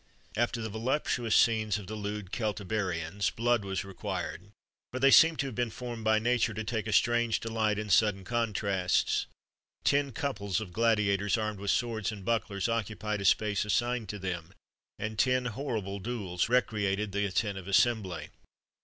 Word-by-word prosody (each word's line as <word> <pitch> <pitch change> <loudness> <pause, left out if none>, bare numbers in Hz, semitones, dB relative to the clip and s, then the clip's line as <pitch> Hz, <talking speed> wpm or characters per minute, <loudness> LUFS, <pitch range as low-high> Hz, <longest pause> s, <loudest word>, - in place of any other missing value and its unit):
After 120 0 0
the 110 - -3
voluptuous 115 0 0
scenes 110 -3 +3
of 105 - -8
the 105 - -7
lewd 105 -2 -5
Celtiberians, 100 -4 -1
blood 120 -1 +1
was 95 0 -3
required: 95 -1 -5 0.4
for 130 - -4
they 135 +1 +5
seem 165 +3 +7
to 140 - -1
have 135 - -4
been 120 +1 -1
formed 120 -1 -6
by 110 0 +4
nature 110 -1 +1
to 110 - -3
take 110 -1 -2
a - - -2
strange 120 +1 +3
delight 110 -2 0
in 105 -1 -3
sudden 100 -3 +3
contrasts. 100 -5 0 0.6
Ten 140 -1 +2
couples 105 -7 -2
of 100 -5 -7
gladiators, 105 -2 +2
armed 110 -2 -2
with 100 0 -3
swords 115 -3 0
and 100 -3 -9
bucklers, 105 -3 0
occupied 105 -2 -2
a - - -3
space 105 0 +3
assigned 120 +1 0
to 105 - -4
them, 90 -4 -5 0.4
and 110 0 -4
ten 130 -1 +3
horrible 110 -5 -3
duels 100 -4 -2
recreated 105 -4 +1
the 100 +1 0
attentive 95 -1 -2
assembly. 100 -2 +1
110 Hz, 160 wpm, -30 LUFS, 100-115 Hz, 0.6 s, seem